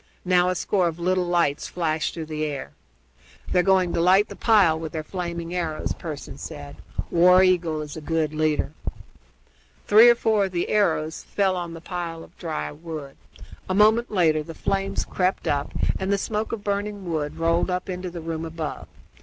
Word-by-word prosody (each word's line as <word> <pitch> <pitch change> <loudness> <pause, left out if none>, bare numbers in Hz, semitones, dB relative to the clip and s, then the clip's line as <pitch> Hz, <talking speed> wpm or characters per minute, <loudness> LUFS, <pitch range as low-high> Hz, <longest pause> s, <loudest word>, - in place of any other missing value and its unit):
Now 180 0 +4
a 185 - 0
score 185 0 +1
of 165 -1 -3
little 180 +1 0
lights 170 -5 +1
flashed 160 -3 -1
through 165 -2 -4
the 155 0 -4
air. 145 -3 -4 0.8
"They're 180 - +4
going 185 -2 +3
to - - +1
light 190 +4 +4
the - - -8
pile 195 -9 +4
with 160 -1 -6
their 155 -1 -3
flaming 170 -1 -5
arrows," 165 -4 -2
Pearson 150 -4 -7
said. 145 -3 -8 0.3
"War 180 +2 +6
Eagle 170 -4 +2
is 150 -1 -8
a 160 - -7
good 155 -1 -1
leader." 155 -2 0 1.1
Three 220 +3 +8
or 240 - +6
four 220 -3 +2
of 190 - -6
the 175 - -1
arrows 160 -6 +1
fell 195 -2 0
on 170 -2 -4
the 165 - -9
pile 170 -1 -5
of - - -17
dry 75 0 -3
wood. 155 -4 -8 0.5
A 185 - +1
moment 220 +3 +4
later 160 -6 +2
the 160 +2 -9
flames 195 0 -1
crept 185 +1 -1
up 145 -1 0 0.3
and 190 +1 -1
the 200 - +3
smoke 215 +2 -2
of 220 -3 -4
burning 205 -1 -3
wood 155 -2 -2
rolled 165 +2 +1
up 180 0 -2
into 180 -1 -4
the 170 -1 -7
room 165 0 -4
above. 160 -2 -5
170 Hz, 185 wpm, -24 LUFS, 160-190 Hz, 1.1 s, Three